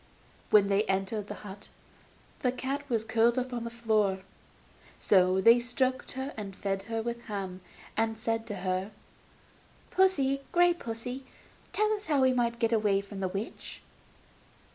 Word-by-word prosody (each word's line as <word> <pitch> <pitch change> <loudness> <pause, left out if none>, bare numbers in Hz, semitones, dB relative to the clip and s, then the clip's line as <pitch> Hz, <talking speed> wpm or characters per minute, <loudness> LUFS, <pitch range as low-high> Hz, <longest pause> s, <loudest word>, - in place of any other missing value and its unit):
When 205 -2 +6
they 200 +1 +3
entered 195 +2 -1
the 210 - -5
hut 200 0 -8 0.7
the 250 - +1
cat 265 +3 -3
was 230 -3 +1
curled 225 +2 +3
up 255 0 -1
on 235 -1 -3
the - - -3
floor. 215 -5 +1 0.8
So 185 -1 +4
they 230 +5 +7
stroked 255 +2 -1
her, 265 +2 -4
and 200 -3 -6
fed 195 0 -2
her 225 -1 -1
with 235 0 -3
ham, 190 -3 -5 0.3
and 225 0 0
said 225 0 -2
to 210 - -4
her: 185 +2 0 1.0
'Pussy, 275 -8 +3
grey 350 0 +5
pussy, 245 -2 -5 0.5
tell 430 +1 +2
us 420 0 -4
how 290 -3 +3
we 260 0 +4
are 240 -2 +2
to 235 - -14
get 230 0 +1
away 210 -3 +3
from 200 0 -9
the 190 - 0
witch? 195 +4 -6
225 Hz, 165 wpm, -30 LUFS, 200-255 Hz, 1.0 s, they